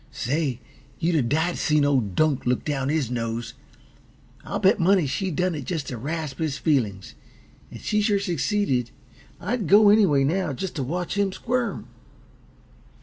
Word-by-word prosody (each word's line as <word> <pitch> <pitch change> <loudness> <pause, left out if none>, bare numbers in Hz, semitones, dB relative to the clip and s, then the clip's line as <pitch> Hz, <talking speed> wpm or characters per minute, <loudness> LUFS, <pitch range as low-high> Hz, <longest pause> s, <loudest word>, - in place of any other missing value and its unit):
Say, 135 -1 -2 0.4
you'd 175 +1 0
a 155 - +3
died 160 +8 0
to - - -6
seen 150 -1 +3
old 125 -10 +1
Dunk 155 -5 +1
look 125 0 0
down 135 -2 -1
his 145 -6 0
nose! 115 -1 -3 0.9
I'll - - -3
bet 190 +1 +3
money 185 -1 +3
she 190 +8 -2
done 180 +2 0
it 145 -4 -5
just 155 -1 -3
t' - - -5
rasp 145 +3 -4
his 155 -4 -1
feelin's 110 - -1 0.6
and - - -10
she 210 0 0
sure 205 -1 +2
succeeded. 175 - 0 0.5
I'd 210 0 -2
go 205 +4 +7
anyway, 195 -10 +4
now, 160 +1 0
just 185 +7 -5
t' 145 - -2
watch 175 +8 -3
him 200 -1 +1
squirm." 240 +1 -2
155 Hz, 165 wpm, -24 LUFS, 135-190 Hz, 0.9 s, go